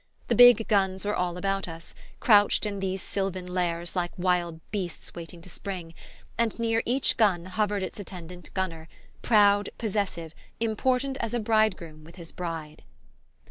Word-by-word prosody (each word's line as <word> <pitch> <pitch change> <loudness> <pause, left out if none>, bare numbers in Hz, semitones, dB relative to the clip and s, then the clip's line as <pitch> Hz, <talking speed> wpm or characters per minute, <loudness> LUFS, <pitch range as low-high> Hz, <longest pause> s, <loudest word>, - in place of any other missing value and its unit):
The - - +3
big 245 -2 +8
guns 190 -2 +1
were 210 - 0
all 180 -1 -1
about 195 +1 -1
us, 165 0 -9 0.3
crouched 205 -1 +5
in 200 -1 -3
these 190 0 -2
sylvan 190 -2 -3
lairs 175 -1 -2
like 175 -1 0
wild 175 -2 0
beasts 185 -5 -5
waiting 170 0 -9
to - - -13
spring; 180 -3 -6 0.5
and 230 -2 +1
near 225 -1 +1
each 255 +3 +2
gun 190 -7 +3
hovered 205 +1 -1
its 185 - -6
attendant 180 -3 -9
gunner, 165 -4 -3 0.3
proud, 205 -2 +4
possessive, 190 -7 -2 0.3
important 250 +4 0
as 230 -2 -3
a - - +1
bridegroom 210 -8 0
with 165 +2 -14
his 170 -3 -10
bride. 165 -3 -6
190 Hz, 155 wpm, -27 LUFS, 175-215 Hz, 0.5 s, big